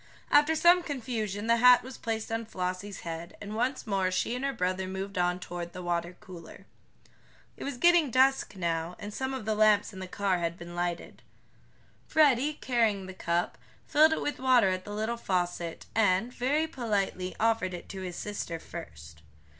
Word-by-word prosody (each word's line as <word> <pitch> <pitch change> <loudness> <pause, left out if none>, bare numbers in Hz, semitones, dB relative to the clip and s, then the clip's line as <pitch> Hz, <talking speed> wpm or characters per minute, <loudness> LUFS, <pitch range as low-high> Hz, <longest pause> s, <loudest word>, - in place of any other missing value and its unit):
After 300 +2 +5
some 350 +3 +6
confusion 225 - -3
the 230 +1 +4
hat 250 +1 +7
was 260 0 -9
placed 225 -1 -3
on 225 0 -2
Flossie's 185 0 -4
head, 165 0 -7
and 205 +1 -7
once 250 +4 -1
more 195 -3 +1
she 185 +5 -1
and 250 - -4
her 275 - +1
brother 185 -4 -1
moved 190 +1 -5
on 180 -1 +1
toward 175 -1 -6
the 180 -1 -7
water 175 0 -2
cooler. 175 -3 -12 0.9
It - - -8
was 275 -3 -4
getting 345 -1 +5
dusk 260 -2 +3
now, 170 -1 -2
and 205 +1 -7
some 265 +3 -3
of 265 -5 -5
the 220 - +1
lamps 210 -1 +3
in 190 - -9
the 185 - -6
car 190 -1 0
had 170 0 -2
been 175 0 -9
lighted. 175 -1 -3 0.9
Freddie, 295 -2 +4
carrying 225 -8 0
the 190 - -8
cup, 170 -1 -1 0.3
filled 310 +2 +5
it - - -2
with 290 - -3
water 255 -6 +4
at 185 0 -2
the 205 - -7
little 220 +3 -2
faucet, 175 -5 -2
and, 215 +2 +2
very 285 +6 +1
politely, 205 - -2
offered 220 -5 +1
it 175 - -10
to 190 - -6
his 180 -2 -5
sister 205 -5 -4
first. 75 - -10
205 Hz, 185 wpm, -29 LUFS, 180-245 Hz, 0.9 s, hat